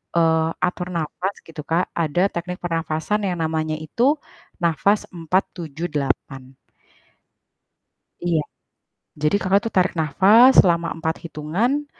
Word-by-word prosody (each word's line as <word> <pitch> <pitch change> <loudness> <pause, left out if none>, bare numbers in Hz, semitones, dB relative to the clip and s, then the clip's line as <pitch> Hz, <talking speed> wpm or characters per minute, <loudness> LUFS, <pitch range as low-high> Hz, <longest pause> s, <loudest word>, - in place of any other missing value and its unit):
eee, 160 -1 +3 0.2
atur 180 0 -3
napas 170 +4 -3
gitu, 160 -2 -8
Kak. 170 +3 +1
Ada 165 +1 0
teknik 180 +1 -4
pernafasan 165 +4 -1
yang 180 -2 -2
namanya 155 -1 -1
itu 235 - +1 0.5
napas 175 +5 +2
478. 155 -6 -3 1.7
Iya. 165 -3 +2 0.8
Jadi 150 +5 +1
Kakak 195 +2 +3
tuh - - -16
tarik 185 0 +3
napas 195 - +5
selama 170 -2 +2
4 160 0 -2
hitungan, 180 - -1
170 Hz, 110 wpm, -22 LUFS, 155-185 Hz, 1.7 s, napas